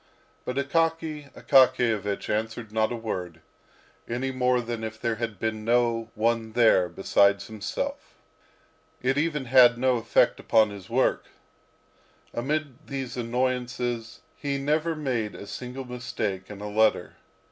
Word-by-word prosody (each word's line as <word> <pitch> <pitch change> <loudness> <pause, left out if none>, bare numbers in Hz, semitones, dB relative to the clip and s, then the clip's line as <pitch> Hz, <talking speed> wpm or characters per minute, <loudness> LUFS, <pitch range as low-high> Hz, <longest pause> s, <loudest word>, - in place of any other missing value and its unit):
But 125 - -3
Akaky 155 0 -1
Akakiyevich 115 -6 +3
answered 110 +1 -3
not 110 +1 +1
a - - -2
word, 90 -7 -5 0.7
any 125 +3 -2
more 125 -1 +2
than 120 -1 -4
if 110 0 -5
there 115 -1 -1
had 115 -4 -4
been 110 +1 -2
no 115 -1 +1
one 115 0 0
there 110 -7 +4
besides 100 +3 +2
himself. 110 -2 -5 0.9
It 135 +3 +2
even 150 -3 -1
had 120 -1 +6
no 130 0 +2
effect 115 - +2
upon 110 -2 +3
his 100 -2 -10
work. 125 +3 +1 1.1
Amid 150 +6 0
all 140 - -20
these 135 -3 -4
annoyances 125 -1 -2
he 140 -1 -2
never 155 +4 0
made 125 -8 -2
a - - -8
single 125 +5 -7
mistake 115 -6 -4
in 105 -1 -9
a 105 - -4
letter. 110 +1 +1
120 Hz, 135 wpm, -26 LUFS, 110-130 Hz, 1.1 s, had